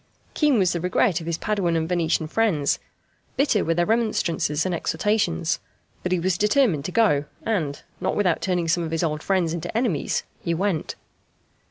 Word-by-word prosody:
Keen 295 -5 +3
was 185 -4 +3
the 170 - -2
regret 180 0 +1
of 165 - -8
his 170 -1 -1
Paduan 195 -5 0
and 160 0 0
Venetian 170 -2 +1
friends; 165 -7 +1 0.6
bitter 270 -7 +2
were 165 - 0
their 175 0 +2
remonstrances 175 -8 0
and 185 - 0
exhortations. 170 - 0 0.4
But 180 - -3
he 185 - +2
was 180 +1 0
determined 210 - +2
to 185 - -3
go, 180 -10 +3 0.2
and, 160 -11 -2 0.2
not - - -1
without 185 -5 +1
turning 180 -3 0
some 170 +1 +1
of 165 - -3
his 165 +1 -1
old 155 -2 -1
friends 180 -3 +1
into 170 +5 -3
enemies, 230 - 0 0.2
he 170 - -1
went. 185 -2 -1
175 Hz, 180 wpm, -24 LUFS, 160-210 Hz, 0.6 s, Keen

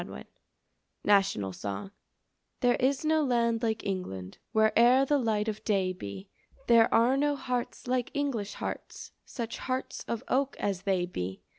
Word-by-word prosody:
XXI - - -9 0.8
=National 195 - +2
Song= 100 - -5 0.7
There 245 -1 +4
is 270 +3 +1
no 315 0 +3
land 235 -3 +1
like 220 -2 -1
England 100 - -4
Where'er 235 +4 +5
the 290 +1 +2
light 220 -3 0
of 215 -1 -3
day 190 -3 +1
be; 100 - -8 0.4
There 230 -2 +5
are 235 +3 +4
no 290 +1 +2
hearts 250 -3 -3
like 250 -1 0
English 260 -8 -1
hearts, - - -6
Such 230 -2 -5
hearts 260 0 -3
of 235 - -3
oak 275 +1 0
as 195 -3 -1
they 185 -2 +2
be. 95 - -5
225 Hz, 150 wpm, -29 LUFS, 195-255 Hz, 0.8 s, Where'er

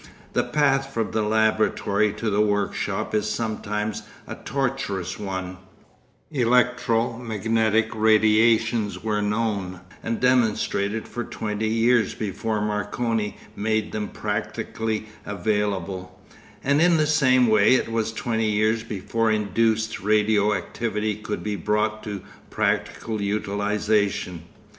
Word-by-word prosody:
The - - +2
path 135 -2 +1
from 115 -4 -2
the 110 - 0
laboratory 110 -1 +2
to 110 0 -2
the 100 +1 +2
workshop 105 0 -1
is 105 0 +1
sometimes 105 -1 -2 0.2
a - - -6
tortuous 130 -10 -3
one; 95 -2 -4 0.7
electro 125 -2 +2
magnetic 110 -1 +1
radiations 110 0 +3
were 105 -1 0
known 105 -4 -1 0.2
and 115 0 -2
demonstrated 110 -4 +1
for 120 - -4
twenty 110 -1 -3
years 115 0 +2
before 110 +1 -2
Marconi 105 +1 -1 0.2
made 110 +1 -1
them 105 -1 -3
practically 110 +1 -3 0.2
available, 100 -3 -2 0.4
and 140 +2 +3
in 170 -1 +5
the 155 - +3
same 135 -5 +4
way 110 +2 +5
it 115 - 0
was 115 -1 0
twenty 110 -1 -1
years 110 +2 +2
before 115 +1 -1
induced 110 +1 +1
radio 105 0 +3
activity 105 +2 -2
could 105 +1 -5
be 105 -1 -2
brought 105 +3 0
to 100 -3 -5 0.3
practical 110 -2 -1
utilisation. 100 -3 0
110 Hz, 115 wpm, -24 LUFS, 105-115 Hz, 0.7 s, in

